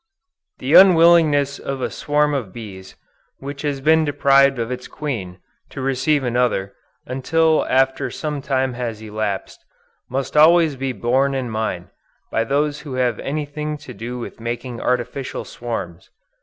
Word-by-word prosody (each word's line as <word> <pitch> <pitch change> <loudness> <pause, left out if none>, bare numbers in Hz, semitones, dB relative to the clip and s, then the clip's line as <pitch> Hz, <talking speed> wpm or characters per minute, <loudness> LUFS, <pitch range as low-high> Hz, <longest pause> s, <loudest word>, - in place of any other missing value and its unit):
The 135 +4 -2
unwillingness 165 -6 +6
of 135 -1 -4
a - - -2
swarm 150 0 +1
of 125 -9 -3
bees, 95 -4 -10 0.4
which 140 0 -7
has 145 -2 -2
been 160 +2 +4
deprived 140 -2 +4
of 115 +1 -3
its 125 0 -5
queen, 110 -12 -5 0.3
to - - -9
receive 135 +2 +1
another, 120 -6 0 0.3
until 160 +5 +1
after 135 0 +2
some 150 -2 -4
time 130 -2 0
has 120 -3 -4
elapsed, 105 -2 -4 0.5
must 135 +2 -3
always 160 0 +5
be 135 0 -2
borne 130 +3 +1
in 125 -3 -3
mind, 110 -5 -3 0.4
by 115 - +1
those 145 +3 0
who 140 -4 -7
have 125 -3 0
anything 150 +1 -4
to 145 -3 -11
do 120 +2 -6
with 120 - -8
making 120 +1 -5
artificial 125 +2 -2
swarms. 95 -8 -6
135 Hz, 145 wpm, -20 LUFS, 120-145 Hz, 0.5 s, unwillingness